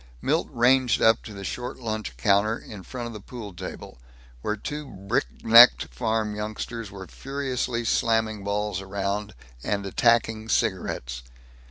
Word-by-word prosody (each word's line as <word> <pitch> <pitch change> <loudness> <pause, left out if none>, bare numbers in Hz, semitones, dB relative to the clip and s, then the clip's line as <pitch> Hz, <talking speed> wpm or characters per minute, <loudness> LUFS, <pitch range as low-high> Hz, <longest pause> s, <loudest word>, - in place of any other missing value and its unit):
Milt 155 - 0
ranged 125 0 +3
up 110 0 +4
to - - -10
the 100 - -7
short 120 +5 -5
lunch 110 - -4
counter, 100 - +3
in 105 -3 -10
front 120 +5 -6
of 120 - -6
the 105 - -7
pool 105 -1 -9
table 75 -7 -8 0.4
where 105 - -1
two 150 +7 -5
brick 100 +1 -1 0.2
necked 115 +2 +7
farm 110 -2 -1
youngsters 110 +1 -5
were 95 -1 -9
furiously 130 -2 -3
slamming 110 -2 +1
balls 100 -1 -1 0.8
and 100 -1 -1
attacking 110 +1 +2
cigarettes. 85 - -1
110 Hz, 140 wpm, -25 LUFS, 100-120 Hz, 0.8 s, necked